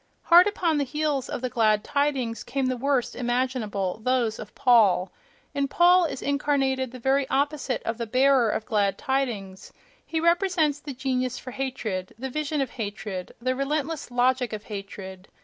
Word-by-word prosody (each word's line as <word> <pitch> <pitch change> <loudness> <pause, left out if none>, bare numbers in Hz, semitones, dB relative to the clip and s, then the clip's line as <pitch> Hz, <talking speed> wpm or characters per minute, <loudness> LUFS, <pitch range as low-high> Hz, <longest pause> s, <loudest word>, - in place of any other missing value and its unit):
—Hard 350 +3 +7
upon 340 -7 0
the - - +2
heels 295 -1 -1
of - - -4
the 255 - -2
"glad 215 -3 +2
tidings" 275 -5 -1
came 265 +2 -2
the 255 0 0
worst 265 0 0
imaginable: 240 -6 -1
those 245 -3 +1
of 210 - -9
Paul. 215 -7 +4 0.4
In 280 -1 0
Paul 350 +4 +5
is 290 - -4
incarnated 275 -2 0
the 255 - -8
very 265 +2 +1
opposite 285 -2 -1
of 225 +1 -3
the 235 - -3
"bearer 255 0 +4
of 220 - -2
glad 205 -3 +1
tidings"; 230 -9 -3 0.3
he 325 - -2
represents 340 -3 +2
the 290 -2 -8
genius 255 -1 -1
for 255 - -8
hatred, 235 -9 -4
the 265 +2 -5
vision 305 +1 -1
of 265 - -2
hatred, 205 -4 -5
the 255 +2 -1
relentless 295 +2 -2
logic 250 0 +1
of 215 0 -5
hatred. 195 -2 -8
255 Hz, 165 wpm, -25 LUFS, 225-285 Hz, 0.4 s, Hard